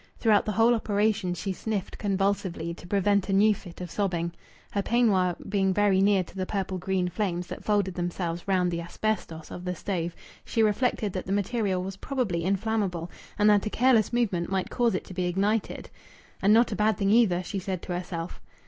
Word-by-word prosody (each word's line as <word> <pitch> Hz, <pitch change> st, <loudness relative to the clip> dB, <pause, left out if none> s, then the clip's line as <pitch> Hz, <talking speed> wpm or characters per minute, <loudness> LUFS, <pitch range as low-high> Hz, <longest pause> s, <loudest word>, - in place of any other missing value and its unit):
Throughout 215 Hz, -3 st, +3 dB
the 215 Hz, -, -1 dB
whole 225 Hz, +3 st, +4 dB
operation 210 Hz, -4 st, 0 dB
she 195 Hz, +2 st, -3 dB
sniffed 205 Hz, 0 st, -4 dB
convulsively, 195 Hz, -4 st, -1 dB
to 175 Hz, -, -12 dB
prevent 200 Hz, +1 st, +2 dB
a -, -, +1 dB
new 210 Hz, +2 st, +5 dB
fit 180 Hz, -3 st, -11 dB
of 175 Hz, -2 st, -6 dB
sobbing. 175 Hz, -4 st, -1 dB, 0.4 s
Her 200 Hz, -, 0 dB
peignoir 195 Hz, -6 st, +2 dB
being 195 Hz, -2 st, +1 dB
very 205 Hz, -2 st, +3 dB
near 195 Hz, -1 st, +4 dB
to 175 Hz, -, -16 dB
the 185 Hz, -1 st, -3 dB
purple 190 Hz, -2 st, -2 dB
green 185 Hz, 0 st, 0 dB
flames 180 Hz, -1 st, -2 dB
that -, -, -8 dB
folded 205 Hz, -3 st, +1 dB
themselves 175 Hz, -1 st, -3 dB
round 180 Hz, -2 st, +2 dB
the 170 Hz, 0 st, -2 dB
asbestos 170 Hz, -3 st, -3 dB
of 180 Hz, -, -7 dB
the 180 Hz, 0 st, -3 dB
stove, 175 Hz, -2 st, -3 dB, 0.3 s
she 225 Hz, -, +1 dB
reflected 215 Hz, -2 st, +1 dB
that 185 Hz, -, -4 dB
the -, -, -3 dB
material 200 Hz, -2 st, 0 dB
was 195 Hz, +1 st, -6 dB
probably 210 Hz, -10 st, -2 dB
inflammable, 195 Hz, -3 st, -1 dB, 0.3 s
and 210 Hz, 0 st, +4 dB
that 205 Hz, 0 st, +3 dB
a -, -, 0 dB
careless 235 Hz, -2 st, +3 dB
movement 205 Hz, -8 st, 0 dB
might 190 Hz, -1 st, -1 dB
cause 235 Hz, -5 st, +2 dB
it -, -, -2 dB
to -, -, -10 dB
be 180 Hz, 0 st, -1 dB
ignited. 200 Hz, +4 st, -1 dB, 0.5 s
"And 200 Hz, -, +4 dB
not 230 Hz, +2 st, +5 dB
a -, -, -1 dB
bad 210 Hz, -1 st, +2 dB
thing, 195 Hz, 0 st, +1 dB
either!" 200 Hz, -6 st, +4 dB
she 195 Hz, +2 st, -4 dB
said 185 Hz, -1 st, -4 dB
to 180 Hz, -, -4 dB
herself. 175 Hz, -1 st, -5 dB
195 Hz, 200 wpm, -27 LUFS, 180-210 Hz, 0.5 s, new